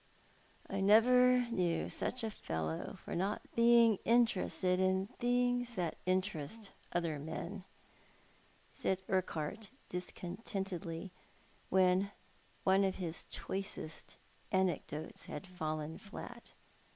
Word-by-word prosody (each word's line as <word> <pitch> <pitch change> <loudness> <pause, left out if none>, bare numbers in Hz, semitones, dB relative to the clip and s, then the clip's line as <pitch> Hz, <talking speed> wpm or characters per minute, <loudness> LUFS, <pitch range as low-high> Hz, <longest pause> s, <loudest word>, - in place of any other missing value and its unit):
" - - -27
I 195 0 -2
never 250 +5 +6
knew 175 -6 +1
such 255 -1 -2
a 220 - -1
fellow 80 - -3
for - - -4
not 195 +4 -1
being 235 -2 +6
interested 200 -5 +3
in 190 0 +3
things 245 +1 +1
that 175 -4 -1
interest 185 +2 -1 0.2
other 165 -4 0
men," 175 +6 -5 1.1
said 190 0 -1
Urquhart 185 +2 -1 0.2
discontentedly, 180 -1 -4 0.6
when 185 +1 +4 0.5
one 190 +1 +5
of 190 -1 +1
his 175 -3 -3
choicest 190 -5 -5 0.3
anecdotes 180 -5 -1
had 150 - -6
fallen 155 -3 -4
flat. 235 +3 -9
190 Hz, 105 wpm, -35 LUFS, 175-220 Hz, 1.1 s, never